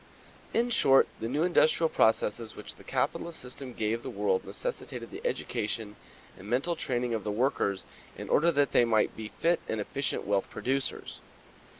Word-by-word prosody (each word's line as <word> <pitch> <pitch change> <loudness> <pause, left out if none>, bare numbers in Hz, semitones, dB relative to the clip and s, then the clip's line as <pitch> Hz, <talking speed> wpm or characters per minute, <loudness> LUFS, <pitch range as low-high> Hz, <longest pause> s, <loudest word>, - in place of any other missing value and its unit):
In 240 +1 +1
short, 135 - +5
the 115 - -2
new 145 +6 0
industrial 170 -2 +4
processes 110 -4 +1
which - - -8
the - - -14
capitalist 170 -1 -1
system 125 +1 -7
gave 115 +1 -1
the - - -6
world 470 -1 0
necessitated - - -5
the 390 - -7
education 110 - -3 0.4
and 95 - -12
mental 135 +9 +1
training 125 -5 -1
of 110 -3 -2
the 105 - -3
workers 105 -4 0 0.3
in - - -6
order 170 +4 +4
that 145 -3 +2
they - - +5
might 110 -2 +2
be 110 -1 -6
fit 170 +9 +1
and 110 - -1
efficient 135 +7 -3
wealth 100 -1 0
producers. 130 - -2
125 Hz, 170 wpm, -29 LUFS, 110-160 Hz, 0.4 s, short